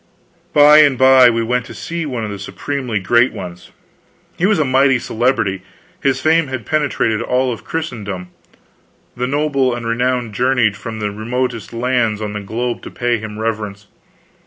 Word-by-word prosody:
By 150 Hz, +1 st, +7 dB
and 145 Hz, -4 st, +5 dB
by 130 Hz, -1 st, +7 dB
we 115 Hz, -1 st, 0 dB
went 125 Hz, +1 st, -1 dB
to 115 Hz, -, -10 dB
see 165 Hz, +9 st, -4 dB
one 125 Hz, -5 st, -4 dB
of 105 Hz, -, -4 dB
the 100 Hz, -, -6 dB
supremely 125 Hz, +3 st, -4 dB
great 120 Hz, +6 st, +3 dB
ones. 90 Hz, 0 st, -9 dB, 0.7 s
He 180 Hz, -, +1 dB
was 210 Hz, -, +2 dB
a 155 Hz, -, +2 dB
mighty 135 Hz, 0 st, +3 dB
celebrity; 115 Hz, -5 st, 0 dB, 0.4 s
his 135 Hz, -1 st, +1 dB
fame 160 Hz, 0 st, +2 dB
had 130 Hz, -4 st, -5 dB
penetrated 135 Hz, -7 st, 0 dB
all 125 Hz, +1 st, 0 dB
Christendom; 105 Hz, -, -5 dB, 0.9 s
the 125 Hz, +1 st, -2 dB
noble 140 Hz, -3 st, +1 dB
and 120 Hz, -1 st, -6 dB
the -, -, -2 dB
renowned 125 Hz, -1 st, -1 dB
journeyed 125 Hz, -2 st, +2 dB
from 110 Hz, +2 st, -7 dB
the 105 Hz, -1 st, -2 dB
remotest 120 Hz, +2 st, -3 dB
lands 115 Hz, -2 st, 0 dB
on 105 Hz, -1 st, -4 dB
the 105 Hz, -, -3 dB
globe 120 Hz, +4 st, -3 dB
to -, -, -8 dB
pay 120 Hz, -1 st, -1 dB
him 105 Hz, -1 st, -7 dB
reverence. 105 Hz, -2 st, -4 dB
120 Hz, 170 wpm, -17 LUFS, 110-130 Hz, 0.9 s, By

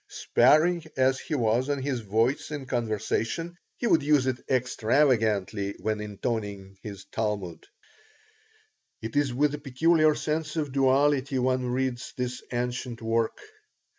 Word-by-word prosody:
Sparing 155 Hz, +7 st, +3 dB
as 130 Hz, 0 st, +3 dB
he 155 Hz, -, -4 dB
was 120 Hz, +1 st, +1 dB
of 145 Hz, -, +1 dB
his 135 Hz, -2 st, -2 dB
voice 115 Hz, +5 st, 0 dB
in 145 Hz, -3 st, -5 dB
conversation, 120 Hz, -, -2 dB, 0.2 s
he -, -, -3 dB
would 200 Hz, -, +4 dB
use 145 Hz, -2 st, +3 dB
it 130 Hz, -1 st, -2 dB
extravagantly 110 Hz, -5 st, +1 dB
when 110 Hz, -1 st, -2 dB
intoning 105 Hz, -2 st, -4 dB
his 100 Hz, -3 st, -8 dB
Talmud 100 Hz, -7 st, -3 dB, 1.4 s
It 110 Hz, +3 st, -5 dB
is 145 Hz, -2 st, +2 dB
with 145 Hz, +4 st, +1 dB
a 150 Hz, -, -4 dB
peculiar 155 Hz, +3 st, +3 dB
sense 155 Hz, 0 st, -2 dB
of 150 Hz, -4 st, -2 dB
duality 135 Hz, 0 st, +2 dB
one 130 Hz, 0 st, +1 dB
reads 125 Hz, 0 st, -2 dB
this 125 Hz, 0 st, -3 dB
ancient 125 Hz, 0 st, -3 dB
work. 115 Hz, 0 st, 0 dB
125 Hz, 135 wpm, -27 LUFS, 110-145 Hz, 1.4 s, would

